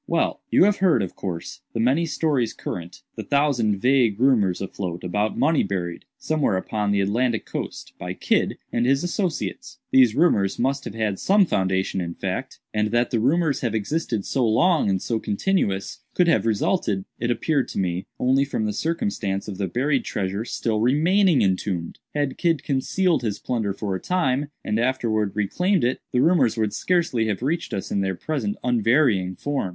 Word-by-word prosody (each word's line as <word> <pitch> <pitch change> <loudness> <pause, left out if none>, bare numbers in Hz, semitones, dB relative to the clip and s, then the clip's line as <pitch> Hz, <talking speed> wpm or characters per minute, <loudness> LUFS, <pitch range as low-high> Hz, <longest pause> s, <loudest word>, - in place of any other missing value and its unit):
"Well; - - 0
you - - +5
have 205 +1 +3
heard, 170 - +3
of 95 - -6
course, 85 -4 -6
the - - -3
many 135 +9 +2
stories 145 -8 0
current—the 85 0 -7
thousand 135 -8 +1
vague 120 -2 +2
rumors 115 -9 +3
afloat 90 -2 -5
about 105 +4 -1
money 155 0 +3
buried, 90 -3 -3
somewhere 150 -11 0
upon 105 +2 -2
the 100 -1 +2
Atlantic 115 +3 0
coast, - - -6
by 90 +1 -5
Kidd - - 0 0.2
and 120 +1 +1
his 135 +3 +2
associates. 185 +7 -3
These 265 -1 +5
rumors 105 - +2
must 135 +2 0
have 105 - -6
had 110 -4 -1
some 200 0 +4
foundation 95 - 0
in 85 -1 -5
fact. - - -4
And 105 0 +1
that 120 +2 +1
the 115 - +1
rumors 150 +5 +1
have 115 -3 -1
existed 110 -1 -2
so 135 - 0
long 150 - +3
and 95 -1 +1
so 115 +4 -2
continuous, 100 - -1 0.2
could 180 - +3
have 165 - +3
resulted, 105 - 0
it 120 - -1
appeared 135 +4 +1
to - - -7
me, 90 -1 -1
only 130 +2 +3
from 135 -6 -2
the 105 - -1
circumstance 155 - -2
of 100 -2 -6
the 95 - 0
buried 135 - 0
treasure 100 +3 -3
still 110 -3 -1
remaining 165 - +3
entombed. 95 -3 -1 0.2
Had 145 -2 -1
Kidd 165 -4 +1
concealed 165 +6 +1
his 110 -4 -2
plunder 110 -5 -2
for 100 0 -3
a 95 - -2
time, 145 -6 0 0.2
and 105 +1 0
afterwards 115 -5 0
reclaimed 180 - +1
it, 125 +2 +1
the 125 - +2
rumors 135 -10 +3
would 110 -2 0
scarcely 145 -5 +1
have 105 +2 -2
reached 165 +5 -1
us 95 - -4
in 100 - +1
their 95 -1 -1
present 115 - -3
unvarying 115 -5 +2
form. 140 -7 -2
115 Hz, 180 wpm, -23 LUFS, 100-150 Hz, 0.2 s, you